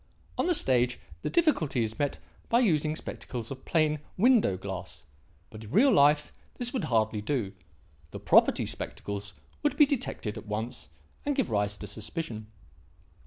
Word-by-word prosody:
On -, -, 0 dB
the 355 Hz, -, +4 dB
stage 125 Hz, -, +2 dB, 0.2 s
the -, -, -2 dB
difficulty 170 Hz, -, +2 dB
is 110 Hz, 0 st, -4 dB
met 145 Hz, -1 st, 0 dB, 0.3 s
by 235 Hz, -, +4 dB
using 155 Hz, -, +2 dB
spectacles 120 Hz, -6 st, -6 dB
of 135 Hz, -, -8 dB
plain 155 Hz, -2 st, +2 dB, 0.2 s
window 220 Hz, -, +4 dB
glass, 95 Hz, -3 st, -7 dB, 0.5 s
but 110 Hz, 0 st, -10 dB
in 105 Hz, -, -10 dB
real 255 Hz, -, +5 dB
life 145 Hz, -2 st, +4 dB, 0.2 s
this 245 Hz, 0 st, -2 dB
would 250 Hz, -11 st, -1 dB
hardly 110 Hz, -5 st, +1 dB
do; 110 Hz, -4 st, -2 dB, 0.6 s
the -, -, -8 dB
'property' -, -, +4 dB
spectacles 100 Hz, 0 st, -6 dB, 0.3 s
would -, -, 0 dB
be 295 Hz, -, +8 dB
detected 230 Hz, -, -3 dB
at 110 Hz, -, -14 dB
once 110 Hz, -, -4 dB, 0.3 s
and 290 Hz, -1 st, 0 dB
give 265 Hz, -, 0 dB
rise 105 Hz, -1 st, 0 dB
to 105 Hz, -, -7 dB
suspicion. 110 Hz, -, -5 dB
125 Hz, 160 wpm, -29 LUFS, 105-170 Hz, 0.6 s, be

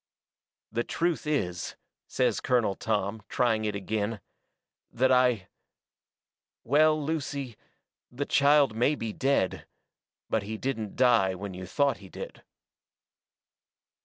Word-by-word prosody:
"The 120 Hz, +1 st, 0 dB
truth 170 Hz, +1 st, -1 dB
is," 90 Hz, -, -1 dB, 0.3 s
says -, -, +1 dB
Colonel 120 Hz, -6 st, +2 dB
Tom, 105 Hz, +1 st, -2 dB
trying 110 Hz, -3 st, +1 dB
it 105 Hz, -1 st, -1 dB
agin, 105 Hz, +2 st, -2 dB, 0.7 s
"that 130 Hz, +2 st, +2 dB
I 125 Hz, -6 st, +3 dB, 1.2 s
well, 155 Hz, +4 st, +4 dB
Lucy, 140 Hz, -5 st, -3 dB, 0.6 s
the 135 Hz, +4 st, -3 dB
child 140 Hz, -4 st, +4 dB
may 125 Hz, +6 st, +2 dB
be 115 Hz, -5 st, -4 dB
dead, 135 Hz, -8 st, 0 dB, 0.6 s
but 110 Hz, -, 0 dB
he 110 Hz, +2 st, -5 dB
didn't 110 Hz, -5 st, -3 dB
die 115 Hz, -7 st, +4 dB
when 100 Hz, +1 st, -6 dB
you 90 Hz, 0 st, -7 dB
thought 140 Hz, +8 st, +1 dB
he 95 Hz, -1 st, -13 dB
did." -, -, -8 dB
115 Hz, 115 wpm, -28 LUFS, 105-140 Hz, 1.2 s, well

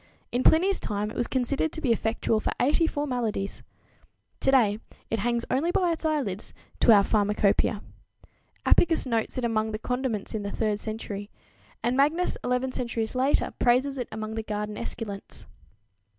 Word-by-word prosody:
In 245 Hz, -, 0 dB
Pliny's 365 Hz, +8 st, +4 dB
time 210 Hz, +1 st, -2 dB
it -, -, -10 dB
was 240 Hz, -, 0 dB
considered 270 Hz, +4 st, 0 dB
to -, -, -5 dB
be 275 Hz, -7 st, +1 dB
effectual 225 Hz, 0 st, +1 dB
for -, -, -1 dB
84 295 Hz, +1 st, +2 dB
maladies! 230 Hz, -7 st, -2 dB, 0.8 s
Today 235 Hz, -6 st, +3 dB, 0.3 s
it 225 Hz, -, 0 dB
"hangs 235 Hz, +2 st, 0 dB
only 285 Hz, +7 st, +1 dB
by 355 Hz, 0 st, +2 dB
its 325 Hz, 0 st, -3 dB
eyelids" 265 Hz, -11 st, -2 dB, 0.2 s
to -, -, +6 dB
our 205 Hz, -2 st, +7 dB
pharmacopoeia. 210 Hz, 0 st, +2 dB, 0.8 s
Apicus 330 Hz, -4 st, +4 dB
notes 230 Hz, 0 st, -1 dB
it 250 Hz, -, 0 dB
among 220 Hz, -1 st, 0 dB
the 215 Hz, -, -3 dB
condiments 250 Hz, -2 st, -2 dB
in 220 Hz, -, -2 dB
the 200 Hz, -, -4 dB
third 210 Hz, -1 st, -1 dB
century, 210 Hz, -2 st, -5 dB, 0.5 s
and 240 Hz, +2 st, +1 dB
Magnus 300 Hz, +6 st, +2 dB
eleven 250 Hz, +1 st, 0 dB
centuries 235 Hz, -3 st, -2 dB
later 260 Hz, +3 st, +1 dB
praises 260 Hz, +3 st, +2 dB
it 245 Hz, -, -3 dB
among 220 Hz, 0 st, -5 dB
the 225 Hz, -, -2 dB
garden 210 Hz, -1 st, -4 dB
esculents. 205 Hz, -3 st, -6 dB
235 Hz, 160 wpm, -27 LUFS, 215-270 Hz, 0.8 s, our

